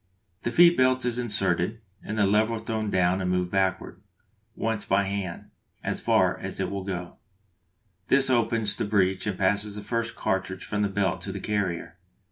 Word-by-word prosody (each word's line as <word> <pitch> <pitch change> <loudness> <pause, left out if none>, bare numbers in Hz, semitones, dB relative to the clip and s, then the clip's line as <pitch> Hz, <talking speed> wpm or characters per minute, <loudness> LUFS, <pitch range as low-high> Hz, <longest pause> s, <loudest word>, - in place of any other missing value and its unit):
The 120 - -2
feed 170 +5 +6
belt 130 0 +3
is 125 0 -1
inserted, 100 -2 0 0.2
and 105 - -5
the 105 - +4
lever 110 +3 +2
thrown 110 -1 -3
down 95 0 +2
and 90 - -1
moved 90 -1 0
backward 95 -1 -1 0.5
once 110 -2 -1
by 100 +1 +2
hand 95 -3 -5 0.3
as - - -1
far - - +2
as - - -5
it - - -1
will 100 -1 -4
go; 90 -2 -5 0.9
this 135 0 +4
opens 115 -4 +2
the - - -2
breech 95 -2 +1
and 100 -3 -2
passes 100 +2 0
the 105 - -6
first 115 +2 -2
cartridge 95 0 -2
from 105 -1 -2
the 100 - +1
belt 95 -2 -1
to - - -4
the - - -5
carrier. 95 -4 -3
100 Hz, 180 wpm, -26 LUFS, 95-115 Hz, 0.9 s, feed